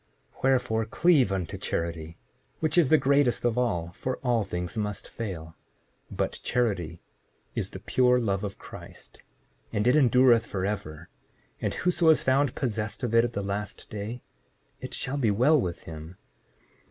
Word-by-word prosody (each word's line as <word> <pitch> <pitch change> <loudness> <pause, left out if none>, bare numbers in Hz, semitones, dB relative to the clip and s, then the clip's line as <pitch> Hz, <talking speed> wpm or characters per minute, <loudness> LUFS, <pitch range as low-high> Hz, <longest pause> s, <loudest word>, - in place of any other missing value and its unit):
Wherefore, 125 -4 +2
cleave 140 - +3
unto 95 -4 -3
charity, 85 -1 -3 0.4
which 155 -1 0
is 170 -7 +5
the 155 - +7
greatest 140 -4 +2
of 120 -2 +2
all, 90 -9 0
for 130 +7 -3
all 120 -4 +2
things 90 -2 -4
must 105 -2 -3
fail— 85 -8 -6 0.6
7:47 - - -8
But - - -1
charity 95 -9 -1 0.5
is - - -2
the - - -8
pure 125 -1 +3
love 100 -5 -1
of 100 -1 -4
Christ, - - -12 0.5
and 105 +1 0
it 125 +3 +5
endureth 125 -4 +5
forever; 95 -5 -4 0.5
and - - -1
whoso 175 -2 +2
is 160 - +5
found 135 0 +2
possessed 110 -2 -3
of 120 -2 -1
it 115 0 +6
at 120 -1 -2
the 100 - -2
last 100 +1 -5
day, 110 +4 -5 0.6
it - - -5
shall 135 +3 -2
be 120 -6 +2
well 130 +8 +4
with 85 -5 -4
him. 80 +2 -9
110 Hz, 160 wpm, -27 LUFS, 95-130 Hz, 0.6 s, the